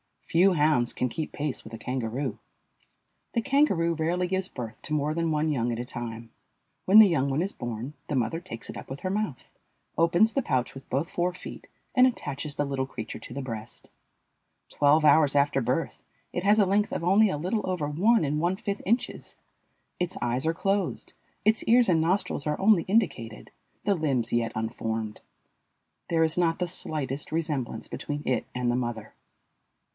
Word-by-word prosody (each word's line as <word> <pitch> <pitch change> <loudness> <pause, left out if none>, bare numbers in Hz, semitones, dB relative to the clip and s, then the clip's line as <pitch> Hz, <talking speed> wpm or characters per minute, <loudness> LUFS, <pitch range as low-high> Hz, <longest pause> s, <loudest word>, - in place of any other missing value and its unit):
Few 185 +3 +4
hounds 150 -6 +2
can 125 - -1
keep 155 +5 -4
pace 145 -6 -3
with 110 - -11
a - - -5
kangaroo. 125 +1 -3 0.9
The 230 - +1
kangaroo 225 - +2
rarely 170 +3 0
gives 190 0 -1
birth 115 - -7
to 155 - -3
more 150 0 +1
than 165 0 0
one 155 0 +1
young 120 -4 0
at - - -3
a - - -2
time. 115 -2 -6 0.5
When 200 +4 +8
the 220 - +10
young 140 -5 +1
one 135 +4 0
is 195 +3 -1
born 120 - -5
the 145 - -2
mother 125 +5 0
takes 170 -10 -8
it - - -6
up - - -9
with 135 +1 -6
her 185 - -2
mouth, 200 -8 -2 0.5
opens 175 +7 +4
the 275 - +1
pouch 130 - -1
with 135 - -12
both 140 +6 -1
fore 180 +1 0
feet, 185 - -10 0.3
and 255 0 +6
attaches 145 - -4
the 145 - 0
little 135 -1 -1
creature 110 -4 -7
to - - -10
the 140 - -4
breast. 115 -3 -7 0.8
Twelve 150 +2 +3
hours 145 -1 +5
after 140 -1 +3
birth 125 +7 -2 0.3
it 175 - -3
has 210 +2 +5
a 205 - +6
length 205 +2 +1
of - - -2
only 200 +4 +5
a 150 - -1
little 185 +6 -2
over 175 -5 -1
one 195 +9 +3
and 150 +1 0
one 175 +3 +1
fifth 200 0 -4
inches. 235 +5 -1 0.6
Its 180 +1 -2
eyes 120 +4 -1
are 165 - +2
closed, 195 +1 -1 0.3
its 220 +1 +3
ears 240 -1 +5
and 165 -3 +4
nostrils 165 -3 0
are 150 - -1
only 195 -4 +5
indicated, 165 - -1 0.3
the 200 0 +2
limbs 135 -8 0
yet 115 -1 +1
unformed. 110 -1 -3 0.9
There 165 -1 +2
is 160 +1 0
not 165 -2 +2
the 180 - -1
slightest 145 -4 -4
resemblance 155 -6 -2
between 145 0 -4
it 130 - 0
and 125 -1 +1
the - - 0
mother. 120 -3 -4
155 Hz, 190 wpm, -27 LUFS, 125-185 Hz, 0.9 s, the